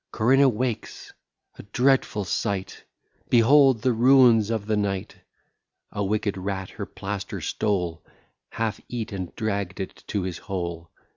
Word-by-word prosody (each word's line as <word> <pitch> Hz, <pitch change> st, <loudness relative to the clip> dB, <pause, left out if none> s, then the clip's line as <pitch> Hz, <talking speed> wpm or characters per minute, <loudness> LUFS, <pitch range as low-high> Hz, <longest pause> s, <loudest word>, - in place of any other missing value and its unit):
Corinna 135 Hz, +5 st, +4 dB
wakes. 120 Hz, 0 st, -4 dB, 0.5 s
A -, -, -5 dB
dreadful 125 Hz, -1 st, +1 dB
sight! 95 Hz, +1 st, -3 dB, 0.4 s
Behold 130 Hz, 0 st, +5 dB
the 130 Hz, -, +3 dB
ruins 120 Hz, -3 st, +5 dB
of 110 Hz, -3 st, -2 dB
the 110 Hz, 0 st, 0 dB
night! 100 Hz, -2 st, -2 dB, 0.8 s
A 100 Hz, -, -2 dB
wicked 100 Hz, 0 st, -1 dB
rat 95 Hz, 0 st, -4 dB
her 100 Hz, -2 st, -6 dB
plaster 100 Hz, 0 st, -5 dB
stole, 90 Hz, -6 st, -2 dB, 0.5 s
Half 110 Hz, -1 st, -3 dB
eat, 115 Hz, -2 st, -4 dB
and 95 Hz, -3 st, -6 dB
dragg'd 100 Hz, -3 st, -3 dB
it 95 Hz, -, -7 dB
to 100 Hz, -3 st, -2 dB
his 90 Hz, -2 st, -4 dB
hole. 85 Hz, -3 st, -5 dB
105 Hz, 135 wpm, -25 LUFS, 95-115 Hz, 0.8 s, Behold